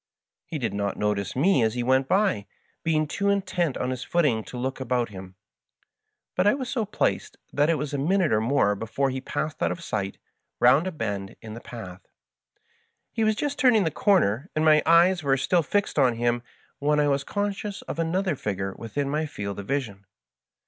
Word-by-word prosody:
He 160 - -4
did 125 -5 -2
not 100 0 -2
notice 105 -1 -1
me 150 +2 +3
as 110 0 +1
he 120 - -1
went 130 +2 +2
by, 190 - +1 0.4
being 155 -1 +2
too 200 +7 -1
intent 185 -6 0
on 125 - -2
his 130 -1 -4
footing 145 -11 +1
to 125 - -8
look 130 +2 -3
about 125 -2 0
him; 95 -2 -10 1.0
but 185 - +2
I 210 - +5
was 260 -2 -4
so 235 -5 -1
placed 210 - -1 0.2
that 145 +2 +2
it 165 - +3
was 150 0 -4
a 140 - -1
minute 180 +3 +2
or 110 - +3
more 115 -3 +2
before 115 +6 -1
he 130 0 -4
passed 155 +3 -4
out - - +2
of 170 - -6
sight 100 -8 -3 0.4
round 135 +8 +5
a - - -2
bend 100 - -4
in 110 -1 -9
the 115 - -8
path. 95 -6 -9 1.1
He 225 - -1
was 215 0 +3
just 290 +4 -3
turning 245 -6 +5
the 160 - 0
comer, 165 - +2
and 155 +1 +1
my 155 -1 +6
eyes 175 +2 +5
were 135 -2 +2
still 170 +7 +2
fixed 200 +1 0
on 125 -4 +4
him, 120 +1 0 0.4
when 150 +1 +2
I 145 - +3
was 140 -1 +1
conscious 205 0 -3
of - - -6
another 180 +1 0
figure 95 -5 -3
within 135 +5 -3
my 155 +3 -1
field 100 -7 -5
of 100 - -7
vision. 115 -8 -3
140 Hz, 200 wpm, -25 LUFS, 115-175 Hz, 1.1 s, my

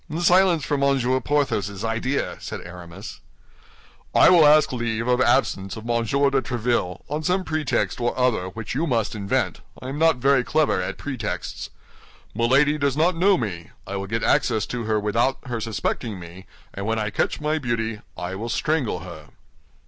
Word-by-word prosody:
"Silence 175 -3 +4
for 145 - 0
Monsieur 130 -2 +2
Porthos's 105 -9 -1
idea!" 115 +5 -1
said - - -6
Aramis. 90 -1 -10 1.0
"I - - +7
will 165 -4 +7
ask 150 -2 +5
leave 115 -1 -2
of 125 0 +2
absence 120 -6 +1
of 110 - -9
Monsieur 120 +4 +1
de 135 -1 +2
Tréville, 120 -6 -1
on 150 +2 -3
some 180 +4 0
pretext 155 -6 -1
or 120 +1 -1
other 125 -8 +1
which 110 +4 -6
you 155 +6 0
must 115 -6 0
invent; 100 -2 -1 0.2
I 130 - -7
am 140 +2 -4
not 165 0 +4
very 135 0 +3
clever 150 -9 +1
at 90 - -4
pretexts. 135 -3 -5 0.6
Milady 135 +7 +3
does 140 -1 0
not 170 +3 +3
know 190 +3 +4
me; 90 - -4 0.2
I 100 - -5
will 100 0 -4
get 115 +2 -2
access 110 -4 +2
to 120 -2 -3
her 110 0 +1
without 115 +6 +1
her 120 -3 -4
suspecting 110 -1 -3
me, 85 +2 -11 0.3
and 100 +1 -5
when 115 0 0
I 105 -1 -2
catch - - -1
my 155 +1 0
beauty, 115 -4 -2 0.2
I 90 +2 -4
will 110 +5 -5
strangle 125 - -1
her." 85 -4 -10
120 Hz, 175 wpm, -23 LUFS, 105-140 Hz, 1.0 s, I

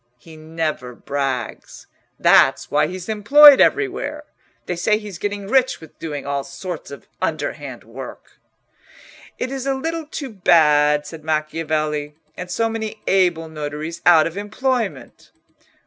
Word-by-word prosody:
He 160 +5 -15
never 155 -5 -4
brags. 135 -3 -4 0.3
That's - - +4
why 150 +1 +3
he's 180 +1 -7
employed 275 +7 +7
everywhere. 300 -7 0 0.4
They 180 - -3
say 210 +5 +1
he's 205 -5 -9
getting 205 -1 -3
rich 260 +3 +2
with 160 -2 -16
doing 150 -4 -5
all 140 0 -2
sorts 160 +5 -7
of 140 - -11
underhand - - -4
work." - - -11 1.0
"It 255 - -3
is 270 0 -4
a 270 - +1
little 325 +3 -4
too 280 -4 -6
bad," 150 -6 +3
said 160 -1 -10
Macchiavelli, 155 -1 -2 0.2
"and 180 0 -7
so 225 +6 0
many 220 -1 -5
able 175 -4 +2
notaries 155 +2 -6
out 165 -3 +6
of 165 +3 -5
employment!" 210 - -3
170 Hz, 135 wpm, -20 LUFS, 150-220 Hz, 1.0 s, employed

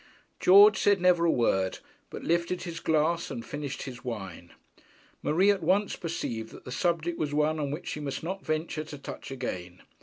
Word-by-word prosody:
George 200 +2 +7
said 205 -1 +4
never 175 -1 +4
a 165 - +4
word, 95 -6 +1 0.3
but - - -8
lifted 170 +2 0
his 170 -2 -5
glass 160 +2 +1
and 115 - -6
finished 145 -2 -5
his 125 -2 -8
wine. 95 -8 -6 0.7
Marie 185 +6 +4
at 200 -2 -1
once 190 +5 +2
perceived 120 - -4
that - - -13
the 125 - -7
subject 170 +2 0
was 145 -1 -1
one 155 +1 +2
on 145 -2 -1
which 150 +5 -5
she - - -4
must 145 -1 -4
not 190 +3 -4
venture 155 0 -2
to 145 - -9
touch 140 - -8
again. 95 -9 -6
155 Hz, 185 wpm, -28 LUFS, 130-175 Hz, 0.7 s, George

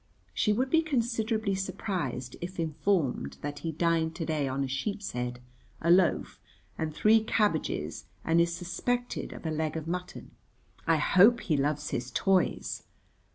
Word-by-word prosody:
(She 210 - +2
would 255 +5 0
be 325 - +5
considerably 230 -7 0
surprised 175 - -3
if 180 +1 -6
informed 160 -2 0
that 145 0 -4
he 165 - -3
dined 165 0 +1
to 165 - -3
day 155 -3 0
on 135 +1 -1
a - - -1
sheepshead, 130 - -3 0.4
a 170 - +2
loaf, 180 -1 +3 0.4
and 160 -1 -2
three 215 +7 +4
cabbages, 165 - 0 0.2
and 165 +1 +4
is 170 0 +2
suspected 190 +8 -2
of - - -10
a 160 - 0
leg 155 0 -1
of 160 0 -5
mutton.) 180 +1 -5 0.6
"I 165 - +5
hope 200 +9 +5
he 160 - +1
loves 150 +1 0
his 120 +1 -2
toys?" 185 +7 +1
170 Hz, 155 wpm, -29 LUFS, 150-205 Hz, 0.6 s, be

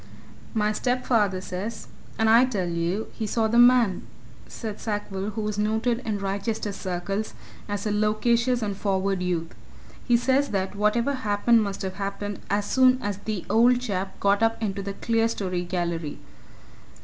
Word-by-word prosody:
"My 210 -1 +2
stepfather 230 -6 +1
says 195 +5 -5 0.3
and 225 - +2
I 230 +3 +7
tell 200 -8 -2
you 170 +5 -2
he 220 - -3
saw 220 +1 +1
the 235 +2 +3
man," 240 -6 +5 0.4
said 215 -3 -6
Sackville, 205 -2 -3
who 215 +1 -4
was 210 -1 -2
noted 220 +3 +1
in 220 -5 -3
Wrychester 200 +2 -2
circles 195 +3 -3 0.3
as 205 0 -3
a 210 - 0
loquacious 230 +3 +1
and 205 -2 -2
forward 195 -1 0
youth; 175 -2 -2 0.5
"he 240 -1 +4
says 265 +4 +2
that 190 -2 -1
whatever 215 +6 +1
happened 225 -1 +2
must 200 -2 -3
have 190 0 -4
happened 200 0 -4
as 205 +1 +1
soon 255 +2 +4
as 205 -5 -3
ever 205 - -19
the 210 -5 -3
old 245 +2 +4
chap 195 -6 -4
got 200 +1 +2
up 225 0 +2
into 200 -3 -2
that 195 0 -7
clerestory 225 -6 0
gallery. 170 -4 -3
210 Hz, 160 wpm, -25 LUFS, 195-230 Hz, 0.5 s, I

